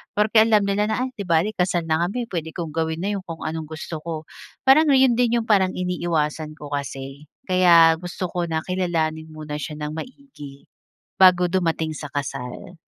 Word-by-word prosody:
porke 215 Hz, +1 st, +4 dB
alam 215 Hz, -2 st, +3 dB
nila 200 Hz, +1 st, +1 dB
na, 220 Hz, +3 st, 0 dB
"Ay, 260 Hz, -, -6 dB
di 200 Hz, -, -4 dB
bale 170 Hz, +5 st, +2 dB
kasal 180 Hz, -2 st, 0 dB
na 160 Hz, +1 st, +1 dB
kami, 240 Hz, +5 st, -3 dB
pwede 160 Hz, -2 st, -3 dB
kong 165 Hz, -3 st, -4 dB
gawin 160 Hz, +1 st, -2 dB
na 205 Hz, -, 0 dB
yung 190 Hz, -, -9 dB
kung 165 Hz, -1 st, -7 dB
anong 160 Hz, 0 st, -4 dB
gusto 160 Hz, 0 st, -6 dB
ko." 160 Hz, -2 st, -5 dB, 0.4 s
Para 270 Hz, +4 st, +7 dB
'no, 285 Hz, -, +4 dB
'yon 260 Hz, -2 st, +5 dB
din 240 Hz, -1 st, +3 dB
yung 225 Hz, -, -9 dB
parang 190 Hz, -3 st, +3 dB
iniiwasan 165 Hz, -4 st, -2 dB
ko 145 Hz, -2 st, -10 dB
kasi, 135 Hz, +1 st, -6 dB, 0.2 s
kaya 170 Hz, -3 st, +6 dB
gusto 180 Hz, +1 st, -5 dB
ko 175 Hz, -1 st, -1 dB
na 160 Hz, -1 st, -1 dB
kilalanin 165 Hz, -4 st, -1 dB
muna 155 Hz, -1 st, -6 dB
siya 150 Hz, +2 st, -5 dB
nang 150 Hz, 0 st, -4 dB
maigi, 160 Hz, -, -10 dB, 0.6 s
bago 180 Hz, -1 st, +6 dB
dumating 165 Hz, -4 st, 0 dB
sa 150 Hz, -, -7 dB
kasal. 135 Hz, +4 st, -6 dB
170 Hz, 190 wpm, -22 LUFS, 155-190 Hz, 0.6 s, Para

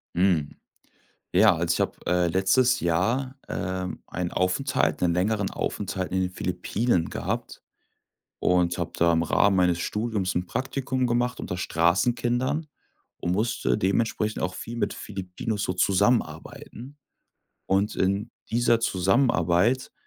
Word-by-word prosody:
Hm, 85 Hz, -5 st, +1 dB, 0.8 s
ja, 95 Hz, -1 st, +5 dB
also, 85 Hz, +1 st, 0 dB
ich -, -, -3 dB
habe, -, -, 0 dB
äh, 90 Hz, 0 st, +2 dB
letztes 95 Hz, +8 st, +3 dB
Jahr, 115 Hz, +11 st, 0 dB
ähm, 95 Hz, 0 st, -3 dB
einen 90 Hz, -1 st, -3 dB
Aufenthalt 90 Hz, 0 st, 0 dB
'nen 85 Hz, -1 st, +2 dB
längeren 100 Hz, +3 st, 0 dB
Aufenthalt 95 Hz, -2 st, -3 dB
in 95 Hz, -, +1 dB
den 90 Hz, 0 st, -1 dB
Philippinen 90 Hz, +2 st, -1 dB
gehabt -, -, -4 dB, 0.8 s
und 90 Hz, 0 st, +2 dB
habe 85 Hz, -, -3 dB
da 85 Hz, 0 st, +4 dB
im 85 Hz, 0 st, +2 dB
Rahmen 100 Hz, +4 st, +3 dB
meines 90 Hz, -2 st, +2 dB
Studiums 105 Hz, -2 st, -2 dB
'n 90 Hz, -, 0 dB
Praktikum 130 Hz, +4 st, -2 dB
gemacht 120 Hz, +1 st, 0 dB
unter -, -, -4 dB
Straßenkindern 120 Hz, -, +1 dB, 0.5 s
und 85 Hz, -, -2 dB
musste 110 Hz, +5 st, 0 dB
dementsprechend 105 Hz, +1 st, 0 dB
auch 90 Hz, 0 st, -2 dB
viel 115 Hz, -, -7 dB
mit 105 Hz, -3 st, -1 dB
Filipinos 100 Hz, +2 st, -5 dB
so -, -, -1 dB
zusammenarbeiten. 115 Hz, +7 st, -1 dB, 0.7 s
Und 100 Hz, +3 st, +1 dB
in 100 Hz, +2 st, 0 dB, 0.2 s
dieser 120 Hz, 0 st, +3 dB
Zusammenarbeit 95 Hz, +1 st, +2 dB
95 Hz, 130 wpm, -26 LUFS, 90-115 Hz, 0.8 s, ja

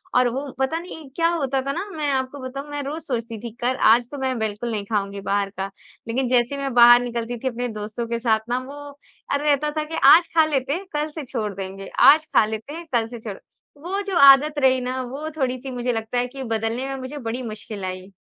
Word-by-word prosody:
और 250 Hz, 0 st, +5 dB
वो 265 Hz, +4 st, -3 dB, 0.2 s
पता 265 Hz, +5 st, 0 dB
नहीं 320 Hz, -5 st, -10 dB
क्या 330 Hz, 0 st, +2 dB
होता 275 Hz, -5 st, 0 dB
था 275 Hz, -, 0 dB
ना 360 Hz, +7 st, -3 dB
मैं 300 Hz, -2 st, -1 dB
आपको 265 Hz, +1 st, -2 dB
बताऊँ 275 Hz, +3 st, -6 dB
मैं 290 Hz, 0 st, -4 dB
रोज़ 300 Hz, +3 st, -5 dB
सोचती 230 Hz, -6 st, -4 dB
थी 235 Hz, -, -5 dB
कल 250 Hz, +2 st, +1 dB, 0.2 s
आज 240 Hz, +1 st, +4 dB
तो 285 Hz, -, -6 dB
मैं 260 Hz, -2 st, -1 dB
बिल्कुल 220 Hz, +2 st, -2 dB
नहीं 205 Hz, -2 st, -3 dB
ख़ाऊँगी 200 Hz, -2 st, -2 dB
बाहर 200 Hz, 0 st, 0 dB
का। 195 Hz, 0 st, -2 dB, 0.4 s
लेकिन 250 Hz, +2 st, 0 dB
जैसे 245 Hz, +2 st, +2 dB
ही 280 Hz, -, -5 dB
मैं 275 Hz, -2 st, -2 dB
बाहर 240 Hz, 0 st, +8 dB
निकलती 240 Hz, 0 st, -3 dB
थी -, -, 0 dB
अपने 245 Hz, 0 st, -2 dB
दोस्तों 215 Hz, +3 st, -4 dB
के 235 Hz, 0 st, -2 dB
साथ 225 Hz, -2 st, +2 dB
ना 250 Hz, +1 st, +1 dB
वो 280 Hz, -, -9 dB, 0.6 s
अ, -, -, +3 dB
रहता 295 Hz, 0 st, +1 dB
था 310 Hz, -, +1 dB
कि 315 Hz, +2 st, -6 dB, 0.2 s
आज 340 Hz, +1 st, +5 dB
ख़ा 320 Hz, -1 st, +5 dB
लेते 280 Hz, -2 st, -1 dB
हैं 380 Hz, +4 st, -4 dB
कल 300 Hz, +1 st, -1 dB
से 305 Hz, -1 st, -6 dB
छोड़ 225 Hz, -6 st, -3 dB
देंगे 195 Hz, 0 st, -7 dB
आज 295 Hz, +5 st, +7 dB
खा 215 Hz, -, +6 dB
लेते 220 Hz, +6 st, -6 dB
हैं 335 Hz, +1 st, -7 dB
कल 230 Hz, -1 st, +2 dB
से 240 Hz, 0 st, -9 dB
छोड़ो। 210 Hz, -3 st, -7 dB, 0.4 s
वो 390 Hz, +4 st, -2 dB
जो 380 Hz, -, 0 dB
आदत 295 Hz, +2 st, +2 dB
रही 260 Hz, -1 st, +4 dB
ना 255 Hz, +1 st, -2 dB
वो 275 Hz, +5 st, -5 dB
थोड़ी-सी 260 Hz, -1 st, -2 dB
मुझे 245 Hz, 0 st, -1 dB
लगता 225 Hz, +2 st, -3 dB
है 245 Hz, 0 st, +1 dB
कि 265 Hz, +1 st, -8 dB
बदलने 225 Hz, +3 st, -2 dB
में 270 Hz, -, -3 dB
मुझे 260 Hz, +2 st, -7 dB
बड़ी 245 Hz, -1 st, -4 dB
मुश्किल 215 Hz, -2 st, -7 dB
आई। 185 Hz, +1 st, -6 dB
255 Hz, 240 wpm, -23 LUFS, 230-285 Hz, 0.6 s, बाहर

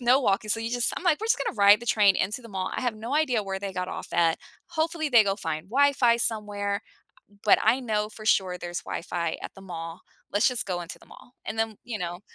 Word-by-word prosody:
no 250 Hz, +3 st, +4 dB
walking, 210 Hz, -2 st, +1 dB
so 225 Hz, -, +2 dB
you 225 Hz, +1 st, -3 dB
just 245 Hz, 0 st, +1 dB
I'm 365 Hz, -, -5 dB
like, 330 Hz, -4 st, +3 dB
"We're 440 Hz, -, -2 dB
just 485 Hz, -, +3 dB
gonna -, -, -3 dB
ride 205 Hz, +2 st, +7 dB
the 240 Hz, -, -9 dB
train 205 Hz, -4 st, +5 dB
into 210 Hz, +6 st, -1 dB
the 230 Hz, -, -11 dB
mall. 190 Hz, -2 st, -3 dB
I -, -, -2 dB
have 245 Hz, -3 st, 0 dB
no 230 Hz, +6 st, -4 dB
idea 255 Hz, -8 st, +2 dB
where 195 Hz, -1 st, -4 dB
they 195 Hz, -1 st, -5 dB
got 180 Hz, 0 st, -3 dB
off -, -, -6 dB
at. 165 Hz, -1 st, +3 dB, 0.3 s
Hopefully, 320 Hz, -1 st, -1 dB
they 230 Hz, -5 st, +6 dB
go 195 Hz, 0 st, 0 dB
find 160 Hz, -1 st, -4 dB
Wi-Fi 270 Hz, -3 st, +4 dB
somewhere, 205 Hz, -3 st, -2 dB, 0.6 s
but 210 Hz, -, +5 dB
I 230 Hz, +5 st, +4 dB
know 210 Hz, -3 st, -1 dB
for 215 Hz, 0 st, -11 dB
sure 185 Hz, -4 st, +2 dB
there's 175 Hz, 0 st, -5 dB
Wi-Fi 170 Hz, -1 st, -3 dB
at -, -, -6 dB
the 195 Hz, -, -12 dB
mall. 165 Hz, -2 st, -7 dB, 0.3 s
Let's 205 Hz, -, +4 dB
just 250 Hz, -2 st, 0 dB
go 180 Hz, -2 st, -2 dB
into 170 Hz, -, -8 dB
the -, -, -19 dB
mall." 245 Hz, -, -16 dB
And 225 Hz, -, -4 dB
then, 225 Hz, -2 st, -1 dB
you 220 Hz, -5 st, -5 dB
know, 175 Hz, +1 st, -4 dB
210 Hz, 250 wpm, -26 LUFS, 190-245 Hz, 0.6 s, ride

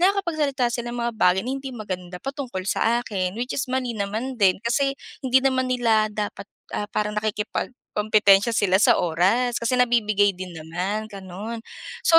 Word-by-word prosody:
nakakapagsalita 310 Hz, -10 st, +1 dB
sila 240 Hz, 0 st, -3 dB
ng 240 Hz, -, -5 dB
mga 235 Hz, -, -1 dB
bagay 180 Hz, +1 st, +5 dB
na 255 Hz, -, -2 dB
hindi 270 Hz, 0 st, -5 dB
maganda 185 Hz, -4 st, -5 dB
pa 275 Hz, +6 st, -5 dB
tungkol 245 Hz, -10 st, -5 dB
sa 230 Hz, +4 st, +2 dB
akin, 185 Hz, -1 st, -2 dB
which 245 Hz, +2 st, -3 dB
is 260 Hz, -1 st, -2 dB
mali 255 Hz, -2 st, -1 dB
naman 220 Hz, +6 st, -3 dB
din. 190 Hz, -2 st, +4 dB
Kasi, 275 Hz, +3 st, +1 dB, 0.3 s
hindi 260 Hz, 0 st, +4 dB
naman 260 Hz, -1 st, +2 dB
nila 225 Hz, -4 st, +3 dB
dapat, 210 Hz, -1 st, -4 dB, 0.3 s
ah, 205 Hz, -, -2 dB
parang 210 Hz, 0 st, -1 dB
nakikipagkompetensya 210 Hz, -1 st, +1 dB
sila 190 Hz, -1 st, +3 dB
sa -, -, +6 dB
oras 195 Hz, +10 st, +2 dB
kasi 235 Hz, +2 st, +1 dB
nabibigay 215 Hz, -5 st, +3 dB
din 185 Hz, 0 st, -7 dB
naman, 180 Hz, +7 st, -3 dB
ganon. 200 Hz, +4 st, -6 dB, 0.4 s
So, 330 Hz, -1 st, +7 dB
220 Hz, 165 wpm, -24 LUFS, 200-255 Hz, 0.4 s, So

